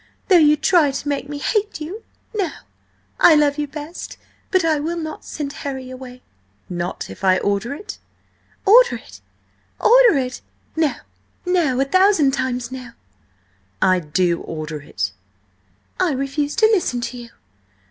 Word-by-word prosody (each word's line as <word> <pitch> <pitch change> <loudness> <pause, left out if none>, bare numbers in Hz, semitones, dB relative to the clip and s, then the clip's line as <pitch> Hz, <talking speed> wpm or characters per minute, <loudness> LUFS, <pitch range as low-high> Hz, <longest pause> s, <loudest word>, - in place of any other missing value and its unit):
Though 365 -3 +7
you 300 -1 +5
try 315 -1 +4
to 275 +1 -5
make 285 -1 -2
me 290 - -4
hate 420 +6 -1
you. 350 +9 -6 0.3
No! 390 -5 0 0.7
I 325 - +7
love 295 -1 +2
you 295 - -1
best. 300 +3 -8 0.3
But 375 -3 +2
I 315 -2 +2
will 330 +4 -3
not 315 -2 -6
send 285 -2 -5
Harry 265 -2 -5
away!" 255 -1 -10 0.4
"Not 175 -1 -4
if - - -12
I 185 -1 +4
order 205 +8 -1
it?" 410 - -9 0.7
"Order 480 +5 +6
it? - - -12 0.6
Order 485 - +6
it? 255 -1 -3 0.3
No! 315 -3 +1 0.5
No! 335 -8 +1
A 270 - +3
thousand 370 -2 +4
times 255 -2 -2
no!" 255 -2 -8 0.9
"I 185 -1 +3
do 170 +2 0
order 155 -1 -6
it!" 95 -8 -3 0.9
"And 370 -2 +3
I - - 0
refuse 285 +2 -2
to 445 - +4
listen 335 - +1
to 245 +1 -5
you!" 235 -1 -10
285 Hz, 155 wpm, -20 LUFS, 250-335 Hz, 0.9 s, Though